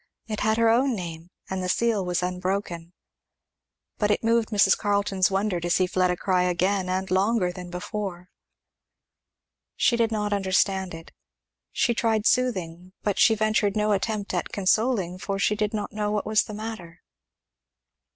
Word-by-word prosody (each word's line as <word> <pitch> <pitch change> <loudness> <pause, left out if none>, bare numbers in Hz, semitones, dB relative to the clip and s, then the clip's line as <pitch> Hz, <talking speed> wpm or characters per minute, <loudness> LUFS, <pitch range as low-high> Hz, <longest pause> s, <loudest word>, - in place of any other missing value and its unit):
It 215 -2 -4
had 220 0 +1
her 230 0 +3
own 255 +2 +2
name 170 -3 -7 0.2
and 190 0 -3
the 180 - -2
seal 225 -1 +1
was 180 0 -1
unbroken. 180 -2 -3 1.1
But 210 - +1
it 210 - +1
moved 230 0 +2
Mrs. 210 -3 +4
Carleton's 200 -2 +1
wonder 195 -1 0
to 175 +1 -3
see 185 +2 +3
Fleda 180 -1 +1
cry 185 -1 +1
again, 185 +2 0
and 190 +1 -2
longer 190 0 +2
than 180 0 -9
before. 180 0 -5 1.4
She 240 - +3
did 230 -1 +1
not 210 -1 -1
understand 190 -2 0
it. 165 0 -12 0.6
She 240 - +1
tried 225 -2 0
soothing, 185 -9 0
but 205 -2 -1
she 225 - +5
ventured 215 -1 +1
no 210 0 +1
attempt 205 +1 -1
at - - -2
consoling, 200 -2 +1
for 195 +1 -3
she 210 +1 +1
did 210 0 -1
not 210 -2 -4
know 210 0 -1
what 210 -1 -1
was 215 0 +2
the 215 - -8
matter. 200 -6 -8
200 Hz, 160 wpm, -25 LUFS, 180-215 Hz, 1.4 s, she